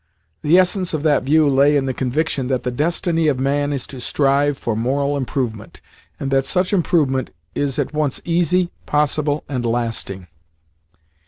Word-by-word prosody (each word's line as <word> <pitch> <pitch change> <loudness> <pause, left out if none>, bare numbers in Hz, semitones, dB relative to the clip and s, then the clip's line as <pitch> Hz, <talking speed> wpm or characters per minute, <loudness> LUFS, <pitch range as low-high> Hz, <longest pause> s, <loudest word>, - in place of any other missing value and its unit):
The 155 +4 +4
essence 185 -1 +2
of 150 - -3
that 150 -2 +3
view 150 +3 +3
lay 140 +2 +4
in 135 - 0
the 130 - -1
conviction 135 +1 -1
that 130 -1 -1
the 125 - -2
destiny 165 +4 0
of 140 -4 +1
man 145 +2 0
is 140 -3 -3
to 130 - -9
strive 140 +1 +1
for 115 -2 -2
moral 140 +5 0
improvement, 125 -5 -4 0.4
and 135 - -3
that 135 0 +2
such 180 +1 +1
improvement 150 -8 +1 0.2
is 140 -2 -1
at - - -2
once 150 -3 0
easy, 175 +1 +1 0.2
possible, 150 0 0
and 130 -4 -3
lasting. 115 -5 -3
145 Hz, 165 wpm, -20 LUFS, 130-155 Hz, 0.4 s, The